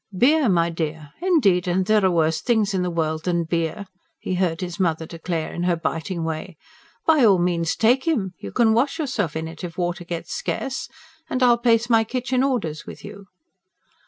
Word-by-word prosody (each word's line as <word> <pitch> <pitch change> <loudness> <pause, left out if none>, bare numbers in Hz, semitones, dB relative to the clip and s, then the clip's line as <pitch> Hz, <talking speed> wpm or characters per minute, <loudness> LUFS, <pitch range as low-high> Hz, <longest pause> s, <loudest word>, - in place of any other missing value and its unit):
"Beer, 280 +3 +4
my 170 -2 +2
dear, 155 -2 -4
indeed 210 - +3
and 185 +1 +1
there 215 0 +3
are 190 - +4
worse 160 -2 +1
things 220 -4 +1
in 190 - 0
the 180 - -1
world 160 -2 -2
than 175 -2 +1
beer!" 165 +4 -2 0.3
he - - -4
heard 180 -1 0
his 180 0 -5
mother 165 -3 0
declare 165 0 -4
in 175 - -4
her 175 -1 +2
biting 165 +1 -3
way. 160 +2 -5 0.5
"By 310 -4 +4
all 200 -4 +6
means 175 -1 0
take 250 +6 +2
him! 210 - 0
You - - -7
can 230 -3 +3
wash 265 +7 +1
yourself 235 - -2
in 160 0 -3
it 165 +2 -10
if 170 -2 -6
water 175 -1 -2
gets 170 -1 -5
scarce, 265 -1 -3 0.4
and 255 - 0
I'll 240 -1 +5
place 235 -1 +3
my 225 -2 +4
kitchen 255 +2 -1
orders 215 - -1
with - - -10
you." 200 -1 -11
180 Hz, 195 wpm, -23 LUFS, 165-235 Hz, 0.5 s, all